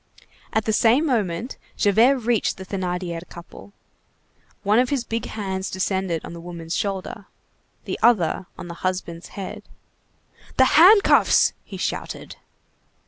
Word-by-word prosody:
At 220 Hz, -, 0 dB
the 220 Hz, -, 0 dB
same 240 Hz, +8 st, +4 dB
moment, 225 Hz, -, -1 dB, 0.2 s
Javert 230 Hz, +7 st, +4 dB
reached 235 Hz, -3 st, 0 dB
the 190 Hz, -, -8 dB
Thénardier 180 Hz, -3 st, -3 dB
couple. 170 Hz, +3 st, -12 dB, 0.9 s
One 210 Hz, +3 st, +3 dB
of 250 Hz, 0 st, +2 dB
his 275 Hz, -4 st, -1 dB
big 230 Hz, -1 st, -3 dB
hands 190 Hz, -3 st, -4 dB
descended 190 Hz, -3 st, -2 dB
on -, -, -8 dB
the 170 Hz, -, -9 dB
woman's 170 Hz, -1 st, -6 dB
shoulder; 195 Hz, +1 st, -4 dB, 0.6 s
the -, -, -4 dB
other 190 Hz, -6 st, +2 dB
on 180 Hz, -, -8 dB
the 170 Hz, -, -7 dB
husband's 180 Hz, -2 st, -3 dB
head. 195 Hz, -2 st, -6 dB, 1.0 s
"The 260 Hz, -, +6 dB
handcuffs!" 390 Hz, +6 st, +6 dB
he -, -, -9 dB
shouted. -, -, -5 dB
195 Hz, 135 wpm, -23 LUFS, 180-230 Hz, 1.0 s, The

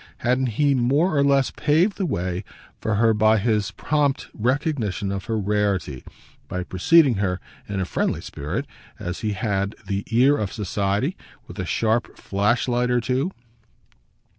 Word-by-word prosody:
Hadn't 125 Hz, +2 st, +2 dB
he 145 Hz, -1 st, +4 dB
more 140 Hz, +8 st, +2 dB
or 140 Hz, -, +4 dB
less 140 Hz, -2 st, +3 dB
paved 160 Hz, +7 st, +2 dB
the 190 Hz, -, 0 dB
way 90 Hz, -, -2 dB, 0.4 s
for 110 Hz, -, -1 dB
her 115 Hz, +2 st, +4 dB
by 110 Hz, +1 st, +4 dB
his 105 Hz, -1 st, +1 dB
prompt 145 Hz, +5 st, 0 dB
recognition 120 Hz, -, -1 dB
of 95 Hz, -1 st, -4 dB
her 115 Hz, -, -1 dB
rarity, 100 Hz, -, -1 dB, 0.4 s
by 90 Hz, 0 st, -3 dB
preceding 130 Hz, -, +4 dB
her, 95 Hz, -2 st, 0 dB, 0.3 s
in 100 Hz, -1 st, -2 dB
a 95 Hz, -, 0 dB
friendly -, -, -1 dB
spirit 70 Hz, +2 st, -4 dB, 0.3 s
as 90 Hz, +1 st, -5 dB
he 105 Hz, -2 st, -1 dB
had 100 Hz, 0 st, -1 dB
the 100 Hz, -1 st, -2 dB
"ear" 130 Hz, +5 st, +4 dB
of 100 Hz, -3 st, -2 dB
society 105 Hz, -, -1 dB, 0.3 s
with -, -, -10 dB
a -, -, -2 dB
sharp 115 Hz, +1 st, 0 dB
flashlight 120 Hz, +5 st, +1 dB
or 125 Hz, 0 st, +3 dB
two? 130 Hz, +7 st, 0 dB
110 Hz, 155 wpm, -23 LUFS, 100-135 Hz, 0.4 s, he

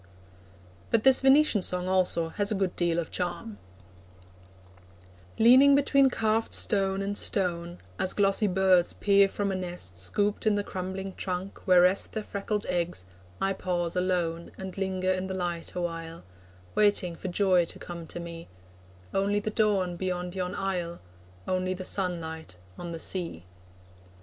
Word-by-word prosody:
But 225 Hz, -, +2 dB
this 265 Hz, -1 st, +6 dB
Venetian 270 Hz, -5 st, +4 dB
Song 180 Hz, 0 st, +1 dB
also 180 Hz, -3 st, +2 dB
has 205 Hz, +4 st, -1 dB
a -, -, +1 dB
good 190 Hz, -2 st, -1 dB
deal 170 Hz, -1 st, 0 dB
of 170 Hz, -2 st, -3 dB
charm: 175 Hz, -, -4 dB, 1.8 s
Leaning 260 Hz, +5 st, +7 dB
between 275 Hz, -1 st, +4 dB
carved 225 Hz, -2 st, 0 dB
stone 195 Hz, -1 st, +1 dB
and 200 Hz, +1 st, -3 dB
stone, 175 Hz, -4 st, 0 dB, 0.2 s
As 185 Hz, -, +1 dB
glossy 200 Hz, +1 st, +2 dB
birds 185 Hz, -2 st, +3 dB
peer 200 Hz, -1 st, +4 dB
from 200 Hz, 0 st, -2 dB
a -, -, -2 dB
nest 175 Hz, -, -4 dB
Scooped 205 Hz, -, 0 dB
in 210 Hz, -, +4 dB
the 205 Hz, -, -1 dB
crumbling 190 Hz, 0 st, -5 dB
trunk 185 Hz, +1 st, -4 dB
where 180 Hz, -1 st, +6 dB
rest 185 Hz, +2 st, +2 dB
Their 220 Hz, -, -3 dB
freckled 205 Hz, 0 st, -3 dB
eggs, 170 Hz, -, -2 dB, 0.3 s
I 195 Hz, 0 st, 0 dB
pause 175 Hz, -2 st, -2 dB
alone 175 Hz, -2 st, -1 dB
And 190 Hz, -1 st, -7 dB
linger 190 Hz, -1 st, -1 dB
in 185 Hz, 0 st, -2 dB
the 190 Hz, -, -4 dB
light 175 Hz, -2 st, -3 dB
awhile, 165 Hz, -1 st, -5 dB, 0.5 s
Waiting 205 Hz, -5 st, +2 dB
for 190 Hz, -, -7 dB
joy 185 Hz, -1 st, +3 dB
to -, -, -8 dB
come 170 Hz, -2 st, -8 dB
to 175 Hz, -, -5 dB
me 170 Hz, -1 st, -8 dB, 0.7 s
Only 200 Hz, +1 st, +1 dB
the 215 Hz, +1 st, -4 dB
dawn 200 Hz, -5 st, +1 dB
beyond 180 Hz, -1 st, -3 dB
yon 180 Hz, -1 st, -3 dB
isle, 180 Hz, -3 st, -3 dB, 0.5 s
Only 185 Hz, 0 st, -1 dB
the 185 Hz, 0 st, -7 dB
sunlight 160 Hz, -, -3 dB, 0.2 s
on 175 Hz, -, -7 dB
the 165 Hz, -, -6 dB
sea. 165 Hz, -, -2 dB
185 Hz, 155 wpm, -28 LUFS, 175-200 Hz, 1.8 s, Leaning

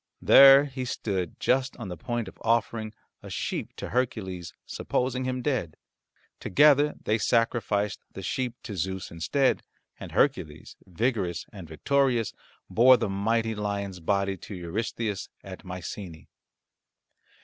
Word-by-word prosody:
There 135 Hz, +1 st, +9 dB
he 130 Hz, -2 st, -5 dB
stood 95 Hz, -7 st, -3 dB
just 130 Hz, +1 st, +1 dB
on 115 Hz, -6 st, -6 dB
the 90 Hz, -, -5 dB
point 120 Hz, +1 st, -3 dB
of -, -, -12 dB
offering 115 Hz, -1 st, 0 dB, 0.3 s
a -, -, -10 dB
sheep -, -, -4 dB
to -, -, -6 dB
Hercules, 110 Hz, -8 st, -2 dB
supposing 130 Hz, 0 st, -2 dB
him 130 Hz, -1 st, -2 dB
dead. 115 Hz, -, -1 dB, 0.6 s
Together 145 Hz, +6 st, +4 dB
they 110 Hz, +1 st, +1 dB
sacrificed 105 Hz, -3 st, +1 dB
the 95 Hz, -, -8 dB
sheep 125 Hz, +4 st, -2 dB
to 105 Hz, -, -6 dB
Zeus 95 Hz, +1 st, -3 dB
instead, 105 Hz, -, +1 dB, 0.4 s
and -, -, -9 dB
Hercules, 75 Hz, +1 st, 0 dB
vigorous 95 Hz, -3 st, -1 dB
and 95 Hz, -5 st, -9 dB
victorious, 120 Hz, -, +1 dB, 0.3 s
bore 125 Hz, +3 st, +6 dB
the 115 Hz, -3 st, -2 dB
mighty 110 Hz, +3 st, 0 dB
lion's 100 Hz, -3 st, -3 dB
body 100 Hz, +2 st, 0 dB
to 100 Hz, -, -9 dB
Eurystheus 100 Hz, +3 st, -3 dB
at -, -, -9 dB
Mycenae. 90 Hz, -2 st, -7 dB
110 Hz, 130 wpm, -27 LUFS, 95-125 Hz, 0.6 s, There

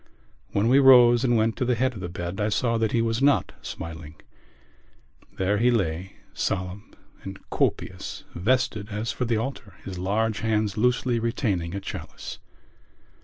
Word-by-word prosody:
When 100 Hz, +2 st, +1 dB
we 130 Hz, +3 st, +6 dB
rose 125 Hz, -3 st, +7 dB
and 120 Hz, -2 st, +3 dB
went 110 Hz, +1 st, +2 dB
up -, -, -27 dB
to 130 Hz, -, 0 dB
the 125 Hz, 0 st, +2 dB
head 130 Hz, +3 st, +1 dB
of 105 Hz, -, -8 dB
the 90 Hz, -1 st, -5 dB
bed 85 Hz, +2 st, -5 dB
I 105 Hz, -, +1 dB
saw 115 Hz, +2 st, +1 dB
that 110 Hz, -1 st, +1 dB
he 115 Hz, -, +2 dB
was 115 Hz, +1 st, -1 dB
not 145 Hz, 0 st, +3 dB
smiling. 80 Hz, -1 st, -8 dB, 1.2 s
There 100 Hz, +2 st, +1 dB
he 120 Hz, +2 st, +4 dB
lay, 95 Hz, -5 st, -1 dB, 0.2 s
solemn 95 Hz, +2 st, -3 dB, 0.3 s
and 95 Hz, 0 st, -7 dB
copious, -, -, -2 dB
vested 110 Hz, +1 st, 0 dB
as 105 Hz, +3 st, -3 dB
for 125 Hz, -, -2 dB
the 115 Hz, -1 st, +1 dB
altar, 115 Hz, -5 st, -5 dB
his 95 Hz, -2 st, -6 dB
large 105 Hz, +3 st, 0 dB
hands 110 Hz, -2 st, 0 dB
loosely 125 Hz, +1 st, +1 dB
retaining 100 Hz, -7 st, -1 dB
a -, -, -2 dB
chalice. 95 Hz, -, -7 dB
110 Hz, 170 wpm, -25 LUFS, 95-120 Hz, 1.2 s, rose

